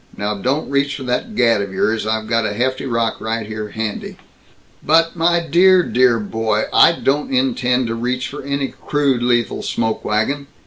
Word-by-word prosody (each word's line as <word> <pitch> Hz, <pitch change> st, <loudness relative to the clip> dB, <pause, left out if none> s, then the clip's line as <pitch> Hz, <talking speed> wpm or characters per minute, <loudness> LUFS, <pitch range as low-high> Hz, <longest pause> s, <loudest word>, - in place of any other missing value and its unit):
Now 105 Hz, +1 st, -2 dB
don't 130 Hz, +9 st, -1 dB
reach 140 Hz, 0 st, 0 dB
for 135 Hz, -, -7 dB
that 130 Hz, -, -3 dB
gat 115 Hz, -, +3 dB
of 100 Hz, -1 st, -5 dB
yours. 110 Hz, +3 st, -1 dB
I've 110 Hz, 0 st, -1 dB
got 115 Hz, 0 st, 0 dB
a -, -, -3 dB
hefty 130 Hz, +3 st, -1 dB
rock 115 Hz, -2 st, -1 dB
right 110 Hz, 0 st, -3 dB
here 110 Hz, 0 st, -6 dB
handy." 110 Hz, 0 st, -5 dB, 0.7 s
"But, 165 Hz, +2 st, +3 dB
my 170 Hz, +1 st, +2 dB
dear, 180 Hz, +3 st, +5 dB
dear 125 Hz, -4 st, +2 dB
boy, 110 Hz, 0 st, -1 dB
I -, -, +7 dB
don't 145 Hz, -3 st, -1 dB
intend 125 Hz, -1 st, +1 dB
to 115 Hz, -, -2 dB
reach 125 Hz, +2 st, -2 dB
for 145 Hz, -, -8 dB
any 140 Hz, 0 st, -2 dB
crude 140 Hz, -4 st, -1 dB
lethal 120 Hz, -1 st, 0 dB
smoke 115 Hz, -1 st, -2 dB
wagon. 140 Hz, +7 st, -1 dB
125 Hz, 180 wpm, -18 LUFS, 110-140 Hz, 0.7 s, I